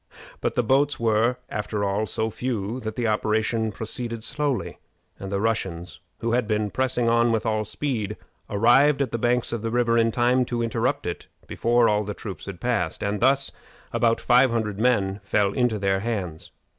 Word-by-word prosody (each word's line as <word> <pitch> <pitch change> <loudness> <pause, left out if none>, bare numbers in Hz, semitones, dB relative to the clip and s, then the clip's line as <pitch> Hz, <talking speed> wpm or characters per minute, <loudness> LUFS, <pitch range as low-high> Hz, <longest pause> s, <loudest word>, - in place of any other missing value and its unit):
But - - -2
the 125 - +2
boats 140 +5 +2
were, 115 +2 +2
after 105 0 -3
all, 100 +2 0
so 110 0 -1
few 115 -1 -3
that 110 -3 -5
the 120 -2 -1
operation 110 +1 0
proceeded 115 +2 -5
slowly, 140 +1 -1 0.4
and 95 0 -6
the 100 - 0
Russians, 95 -6 -2 0.2
who 115 - -1
had 120 -2 +1
been 105 -1 0
pressing 130 -1 0
on 115 0 +3
with 115 0 0
all 110 -1 0
speed, 110 -2 -3 0.3
arrived 135 +7 +4
at 130 - -5
the 115 - -2
banks 120 0 +1
of 115 - -2
the 115 - -2
river 115 0 +2
in 115 0 +3
time 125 +2 +2
to 120 -1 -2
interrupt 120 +5 -1
it 85 - -5 0.2
before 120 0 +2
all 105 0 +2
the 105 0 -5
troops 100 -3 -8
had 95 -3 -7
passed, 115 -10 -1
and 100 0 -1
thus 135 +2 +3 0.4
about 115 -1 +2
five 125 +2 +4
hundred 110 -4 -2
men 105 -5 +1
fell 100 0 +1
into 125 -4 +1
their 95 -1 +1
hands. 95 -8 -4
115 Hz, 185 wpm, -24 LUFS, 105-120 Hz, 0.4 s, arrived